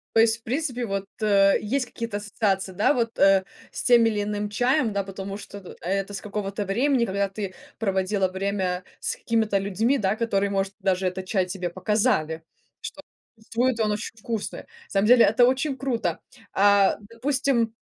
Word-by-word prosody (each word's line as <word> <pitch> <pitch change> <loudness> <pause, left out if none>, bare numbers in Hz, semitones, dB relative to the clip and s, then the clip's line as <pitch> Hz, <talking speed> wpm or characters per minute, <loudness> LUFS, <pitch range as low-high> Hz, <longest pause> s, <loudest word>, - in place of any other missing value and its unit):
То - - +6
есть, 225 0 +4
в - - -37
принципе, 250 0 -2
вот, 195 -2 -3 0.2
э, 200 -2 +4
есть 255 +5 -1
какие-то 230 -3 -5
ассоциации, 205 -2 -1
да, 200 +9 +2
вот, 230 -3 -1
э, 195 -1 +5 0.3
с - - -5
тем 240 -2 +6
или 210 -2 +1
иным 210 0 -3
чаем, 245 +3 +1
да, 200 0 0
потому 195 0 -6
что 200 -1 -9
ты 185 - -11
это 195 +2 -2
с 195 - -5
какого-то 205 0 -4
времени, 245 +5 +2
когда 200 -1 -1
ты 195 -1 -5 0.2
проводила 195 -2 0
время 190 -1 -2 0.2
с - - -2
какими-то 220 -3 0
людьми, 210 +7 +1
да, 200 -4 +1
которые, 200 -3 0
может, 195 0 -1
даже 190 -1 +1
этот 185 +1 -4
чай 185 -1 +1
тебе 180 -1 -4
показали, 185 -4 0 0.4
что - - -7 0.5
твой-то 235 0 +1
он 210 - +1
очень 215 +2 -4
вкусный. 225 -1 -4 0.2
Самом 200 +1 +1
деле 240 0 +7
это 225 +4 +5
очень 265 +2 +1
круто. 230 -11 -1 0.3
А 200 0 +4
допустим, 250 -2 0
205 Hz, 175 wpm, -25 LUFS, 195-230 Hz, 0.5 s, деле